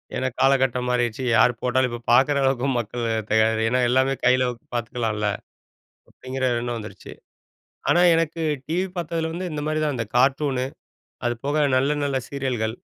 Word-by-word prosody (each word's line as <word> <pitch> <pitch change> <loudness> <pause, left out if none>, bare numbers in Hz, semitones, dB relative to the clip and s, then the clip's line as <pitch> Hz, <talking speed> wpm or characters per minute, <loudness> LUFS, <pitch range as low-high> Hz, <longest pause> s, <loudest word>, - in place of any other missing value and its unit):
ஏன்னா 130 - -1
காலகட்டம் 130 -2 +2
மாறிடுச்சு. 125 0 0
யார் 120 +2 +5
போட்டாலும் 125 +1 +1
இப்ப 120 0 -6
பாக்குற 140 +4 +4
அளவுக்கு 135 0 +1
மக்கள் 120 +1 -4 0.2
தயார் 110 +1 +3
ஏன்னா 125 +3 +1
எல்லாமே 130 +2 +2
கையில 125 0 +4 0.3
பாத்துக்கலாம்ல! 110 -2 -2 0.8
அப்படிங்கிற 130 +1 -5 0.2
எண்ணம் 120 0 -3
வந்துருச்சு. 105 - -10 0.8
ஆனா 175 - +4
எனக்கு 165 0 -1 0.3
டிவி 180 +4 0
பாத்ததில 165 -1 -2
வந்து 180 +2 -4
இந்த 150 -1 -4
மாதிரி 155 0 0
தான், 150 -2 0
இந்த 115 -2 -3
கார்ட்டூனு, 135 0 +2 0.6
அது 120 - 0
போக 145 +2 0 0.2
நல்ல 135 +3 +2
நல்ல 140 -1 -1
சீரியல்கள், 125 -5 -2
130 Hz, 150 wpm, -23 LUFS, 120-145 Hz, 0.8 s, யார்